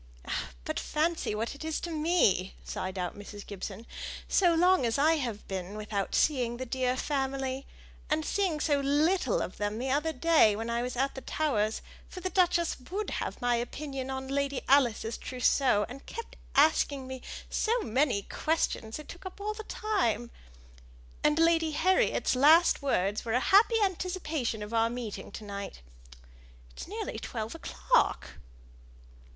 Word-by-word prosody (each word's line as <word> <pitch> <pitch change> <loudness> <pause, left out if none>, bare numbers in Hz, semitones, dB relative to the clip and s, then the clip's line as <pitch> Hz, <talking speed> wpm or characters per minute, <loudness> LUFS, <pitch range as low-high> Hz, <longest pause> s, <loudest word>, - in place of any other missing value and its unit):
"Ah! 65 - -2 0.2
but - - -2
fancy 315 -7 -1
what 225 +2 -2
it 285 - -9
is 320 -1 -2
to 345 - -4
me," 305 - +2
sighed 185 +1 -4
out 180 -1 -3
Mrs. 205 0 -9
Gibson; 200 +2 -7 0.4
"so 350 -3 +4
long 360 -1 +4
as 230 -1 +1
I 315 +3 +4
have 235 -7 -4
been 190 +1 -5
without 210 -2 -2
seeing 245 -5 +2
the 260 - -4
dear 255 0 0
family 270 -1 -2 0.4
and 310 0 +1
seeing 370 -5 0
so 295 -2 +2
little 290 - +2
of 185 - -7
them 205 +1 -2
the 260 +3 -2
other 300 +4 +1
day 310 -7 +4
when 225 +2 -3
I 235 0 0
was 250 0 -4
at 270 +2 +1
the 265 - -7
Towers 225 -10 0 0.3
(for 370 - -8
the 370 +1 -3
duchess 345 -2 +2
would 405 +4 -3
have - - -4
my 245 0 +3
opinion 265 +2 -4
on 265 0 -4
Lady 280 0 -1
Alice's 240 -4 +3
trousseau, 250 -3 +2
and 265 +3 -10
kept 460 - -7 0.2
asking 285 -2 +3
me 260 0 -7 0.3
so 465 +3 +1
many 255 - +1
questions 270 -8 -1
it 305 - -10
took 350 - -10
up 375 - -11
all 420 +1 -2
the 435 0 -7
time) 240 - -1 0.9
and 300 0 +3
Lady 330 -1 +3
Harriet's 370 -3 +2
last 315 +6 +6
words 205 -7 0
were 225 - -2
a 250 - +4
happy 435 - +5
anticipation 325 - -2
of 210 +2 -8
our 230 0 +3
meeting 235 -3 -6
to - - -8
night. 200 - -7 0.9
It's - - -9
nearly - - -4
twelve - - -5
o'clock." - - 0
270 Hz, 165 wpm, -29 LUFS, 225-320 Hz, 0.9 s, last